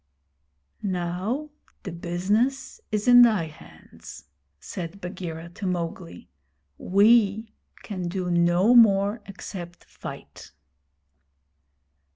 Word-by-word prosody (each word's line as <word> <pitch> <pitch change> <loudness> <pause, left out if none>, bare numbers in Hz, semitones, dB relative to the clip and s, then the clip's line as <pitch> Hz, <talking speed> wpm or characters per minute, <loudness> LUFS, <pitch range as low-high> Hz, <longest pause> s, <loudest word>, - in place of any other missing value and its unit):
'Now 190 - -3 0.3
the 190 - -6
business 200 +11 -1
is 210 +1 -1
in 245 0 +9
thy 215 -8 +4
hands,' 155 - -14 0.4
said 180 - -7
Bagheera 175 -3 -7
to 190 +3 -6
Mowgli. 165 - -5 0.5
'We 215 +2 +3 0.3
can 185 -4 -5
do 180 0 -3
no 175 +6 +3
more 210 -2 +5
except 180 -3 -9
fight.' - - -11
190 Hz, 90 wpm, -25 LUFS, 175-215 Hz, 0.5 s, in